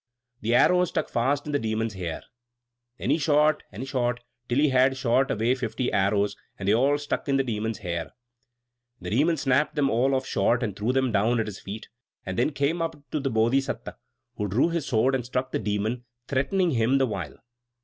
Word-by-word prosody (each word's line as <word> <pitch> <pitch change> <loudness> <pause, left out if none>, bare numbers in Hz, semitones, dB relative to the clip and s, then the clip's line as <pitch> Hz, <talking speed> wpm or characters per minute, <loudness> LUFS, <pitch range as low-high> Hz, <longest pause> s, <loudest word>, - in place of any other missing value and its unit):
The 115 +3 +1
arrow 180 +7 +5
stuck - - -2
fast 135 +4 0
in 150 - -4
the 145 - +1
Demon's 110 -1 -2
hair. 90 -4 -5 0.7
Then 135 - -1
he 155 - +2
shot 150 0 +3
and 115 +6 -6
shot, 125 -3 0 0.3
till 120 - +1
he 150 +1 +4
had 130 0 +3
shot 130 +2 +2
away 115 +2 +1
fifty 125 -1 -2
arrows; 100 +1 +2 0.2
and 100 - -5
they 100 - +5
all 135 +5 +3
stuck 145 0 -3
in 135 - +3
the 135 - +2
Demon's 110 -3 -2
hair. 85 -4 -4 0.9
The - - -6
Demon 155 +9 +2
snapped 140 +2 +1
them 140 -2 +2
all 130 +4 +2
off 130 0 -1
short, 120 0 +1
and 105 -4 -2
threw 105 +5 0
them 130 -1 +1
down 110 +3 +2
at 110 - 0
his 105 -2 -7
feet; 105 +3 -8 0.4
then 95 +10 0
came 145 +4 0
up 165 0 -2 0.2
to 155 - 0
the 135 -1 -1
Bodhisatta, 120 +4 0 0.4
who 105 - -1
drew 115 - +2
his 165 -4 -2
sword 125 +2 +2
and 130 -2 0
struck 125 +2 -3
the - - -1
Demon, 110 +4 -2 0.2
threatening 170 +7 +1
him 125 +1 +2
the 135 - +3
while. 100 - -5
125 Hz, 200 wpm, -26 LUFS, 110-140 Hz, 0.9 s, arrow